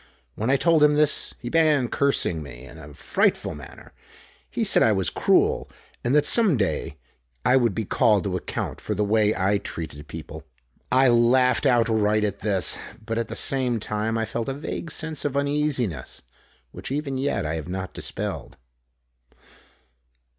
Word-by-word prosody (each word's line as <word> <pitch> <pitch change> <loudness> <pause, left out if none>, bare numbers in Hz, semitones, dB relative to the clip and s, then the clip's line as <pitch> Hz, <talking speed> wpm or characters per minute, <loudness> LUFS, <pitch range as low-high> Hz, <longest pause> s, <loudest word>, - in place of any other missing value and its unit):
When 110 +3 -3
I 135 - +4
told 165 0 +3
him 150 0 +5
this, 150 0 +2
he 120 - -5
began 155 -5 +3
cursing 130 - 0
me 65 -3 -10
in 60 +3 -13
a 75 -1 -11
frightful 70 - 0
manner. - - -13 0.6
He - - -2
said - - +5
I - - +5
was - - 0
cruel - - +2 0.3
and 120 +4 +1
that 150 0 +4
some 210 - +4
day 95 -9 -2 0.5
I 130 - +4
would 120 -6 +2
be 110 - -2
called 105 0 +2
to 95 -2 -2
account 90 - -4
for 105 - -3
the 105 - 0
way 105 0 +2
I 100 +2 +1
treated 75 -5 -7
people. 80 +1 -9 0.5
I 130 +1 +5
laughed 125 +3 +3
outright 110 -4 +2
at 100 -1 -2
this, 100 -3 0 0.3
but 115 +1 -2
at 115 - -2
the - - -6
same 125 -4 0
time 110 +2 -2
I 115 - -1
felt 115 +3 -4
a 135 - -3
vague 155 +3 -5
sense 155 -1 -4
of 140 -1 -2
uneasiness 140 - -1 0.5
which - - -8
even 140 -1 -2
yet 135 - -1
I 75 - -2
have 80 +1 -5
not 95 0 -5
dispelled. - - -5
115 Hz, 170 wpm, -24 LUFS, 95-140 Hz, 0.6 s, him